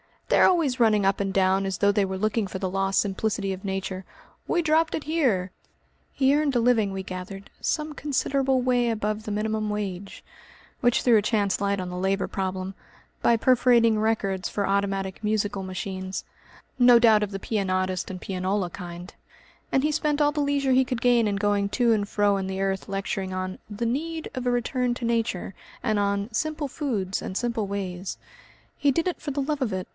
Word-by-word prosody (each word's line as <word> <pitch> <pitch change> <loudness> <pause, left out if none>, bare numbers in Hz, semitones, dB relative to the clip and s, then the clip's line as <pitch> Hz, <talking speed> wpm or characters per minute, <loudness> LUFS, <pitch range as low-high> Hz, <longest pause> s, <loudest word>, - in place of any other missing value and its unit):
They - - +4
are - - +7
always 310 -8 +2
running 215 -4 +4
up 195 0 +2
and 195 -1 -1
down 190 0 +2
as 190 -2 -2
though 200 0 +4
they 205 -1 +2
were 190 0 -4
looking 215 +1 0
for 190 - -5
the 185 0 -2
lost 195 +1 +1
simplicity 200 0 -1
of 190 +1 -9
nature. 190 -1 -3 0.4
'We 345 - +2
dropped 320 +1 +2
it 310 - -4
here!'" 250 - +1 0.6
He 270 0 +3
earned 295 -2 +1
a - - +4
living, 230 -4 +3
we 190 0 -4
gathered, 190 +2 -7
"some 305 0 -1
considerable 270 -2 0
way 245 -1 +2
above 215 -1 -2
the 215 - -5
minimum 215 +1 -1
wage," 200 -2 -5 0.6
which 245 -1 +3
threw 240 -3 +5
a - - +3
chance 205 -2 +1
light 200 -1 0
on 180 - -5
the 180 - -5
labour 190 +1 0
problem 190 0 -3 0.5
by 235 - +4
perforating 235 -2 +4
records 200 -4 0
for 200 - -2
automatic 195 -1 -1
musical 210 -2 -1
machines 185 0 -5 0.6
no 245 -1 +8
doubt 225 -3 +5
of 205 - -3
the 195 - -4
Pianotist 185 -3 -1
and 185 -2 -7
Pianola 185 0 -1
kind 175 0 -8 0.6
and 270 - +2
he 305 - +2
spent 300 -1 0
all 295 0 +4
the 295 - -3
leisure 280 -2 +1
he 260 +1 +4
could 250 -2 -3
gain 240 -3 +4
in 200 - 0
going 200 0 +1
to 235 +2 +2
and 205 -2 +1
fro 205 -1 +2
in 190 -1 -3
the 190 0 -3
earth 195 -1 -1
lecturing 195 -1 -3
on 185 0 -4
"The 215 +3 -3
Need 320 +7 -2
of 255 -2 -3
a - - +3
Return 245 +1 0
to 245 - -5
Nature," 230 -5 -1 0.3
and 215 -4 +1
on 200 +2 -1
"Simple 305 +3 -2
Foods 215 - -2
and 185 - -6
Simple 235 -3 -1
Ways." 190 -2 -4 0.6
He 285 - +3
did 330 +6 +1
it 360 - -6
for 300 - -4
the 280 +1 -1
love 290 +1 -2
of 230 -6 0
it. 185 -1 -3
210 Hz, 200 wpm, -25 LUFS, 195-250 Hz, 0.6 s, no